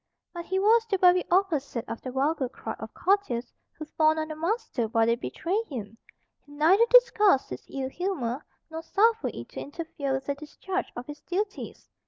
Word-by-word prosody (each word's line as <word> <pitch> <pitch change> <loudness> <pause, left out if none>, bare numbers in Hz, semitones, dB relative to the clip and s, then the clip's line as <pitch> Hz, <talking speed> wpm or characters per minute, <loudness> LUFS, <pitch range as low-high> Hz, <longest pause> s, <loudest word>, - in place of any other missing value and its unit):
But 345 -1 -6
he 380 - -1
was 450 +4 +4
the 390 - +2
very 360 -1 +5
opposite 320 - +1
of 230 - -6
the 255 - -5
vulgar 270 0 0
crowd 225 -3 -7
of 220 0 -7
courtiers 360 -11 0 0.2
who 310 - -6
fawn 310 +1 +2
on 310 0 -3
a - - -5
master 335 - -1
while 225 0 +2
they 230 - +3
betray 345 - -2
him. 225 -6 -6 0.5
He 290 - -19
neither 360 +10 +4
disguised 425 - +5
his 125 - -6
ill 265 -1 -3
humour, 285 -7 -3 0.3
nor 320 0 -5
suffered 445 +6 +2
it - - -8
to - - -8
interfere 290 -2 -4
with 265 0 -2
the 280 - -1
discharge 365 +6 -5
of 245 - -6
his 295 +1 -9
duties. 400 +3 -4
315 Hz, 190 wpm, -27 LUFS, 265-385 Hz, 0.5 s, very